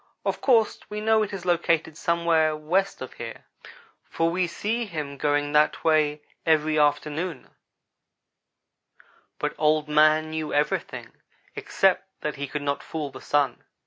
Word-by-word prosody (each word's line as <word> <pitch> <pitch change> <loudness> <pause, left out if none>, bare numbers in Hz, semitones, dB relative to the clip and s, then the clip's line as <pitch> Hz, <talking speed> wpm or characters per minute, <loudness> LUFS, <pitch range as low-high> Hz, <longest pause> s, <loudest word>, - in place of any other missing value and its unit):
Of - - -1
course 230 -5 +3
we 210 - -4
know 220 0 +3
it 210 -1 -2
is 190 -3 -6
located 165 -2 +1
somewhere 170 -3 +1
west 175 +3 -1
of 130 - -9
here, 115 -1 -8 0.6
for 165 0 0
we 180 +1 0
see 225 +7 -2
him 150 -7 -5
going 145 +1 0
that 150 0 +2
way 150 -2 +2 0.2
every 155 -1 +2
afternoon, 150 +1 -1 1.9
but - - -2
Old 155 0 +2
man 155 +1 +4
knew 155 -1 -3
everything 145 0 -1 0.4
except - - +1
that 150 -1 -3
he 140 0 -4
could 150 +1 -4
not 140 0 -1
fool 150 -3 -5
the - - -11
Sun. 145 -2 0
155 Hz, 145 wpm, -25 LUFS, 150-170 Hz, 1.9 s, man